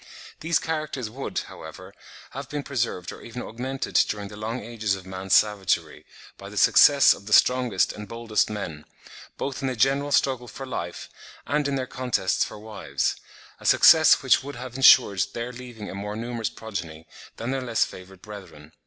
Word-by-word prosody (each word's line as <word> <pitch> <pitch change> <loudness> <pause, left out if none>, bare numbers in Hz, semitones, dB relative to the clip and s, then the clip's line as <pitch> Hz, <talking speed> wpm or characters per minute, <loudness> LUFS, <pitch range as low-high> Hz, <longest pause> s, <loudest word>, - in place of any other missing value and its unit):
These 165 0 +1
characters 155 -8 -4
would, 135 +4 -6
however, - - -11 0.4
have 140 +1 -7
been 145 -1 -4
preserved 115 -9 -3
or - - -11
even 120 +2 -7
augmented 130 +4 -5 0.2
during 100 -1 -4
the 105 - -10
long 110 +4 -4
ages 110 -4 -2
of 95 -1 -10
man's 95 0 0
savagery, 105 -3 +1 0.3
by - - -9
the - - -10
success 140 -2 +6
of 100 - -13
the 110 - -1
strongest 125 -6 +3
and 105 0 -9
boldest 110 -2 -1
men, 85 -8 -6 0.5
both 135 0 -4
in 135 - -1
the 130 - -2
general 135 +4 +1
struggle 130 -3 +1
for 135 - -8
life 85 -9 -6 0.4
and 145 0 0
in 140 - -1
their 130 -1 -2
contests 125 -7 -1
for - - -7
wives; 105 -1 -3 0.4
a - - -14
success - - +6
which - - +4
would 145 -1 -7
have 125 0 -8
ensured 125 -7 +6
their 120 +1 -4
leaving 120 -4 -9
a - - -7
more 105 +2 -5
numerous 115 0 -3
progeny 85 -7 -7 0.3
than 115 +3 -4
their 135 0 -2
less 120 -3 +1
favoured 95 0 -13
brethren. 95 -8 -11
115 Hz, 180 wpm, -25 LUFS, 100-130 Hz, 0.5 s, success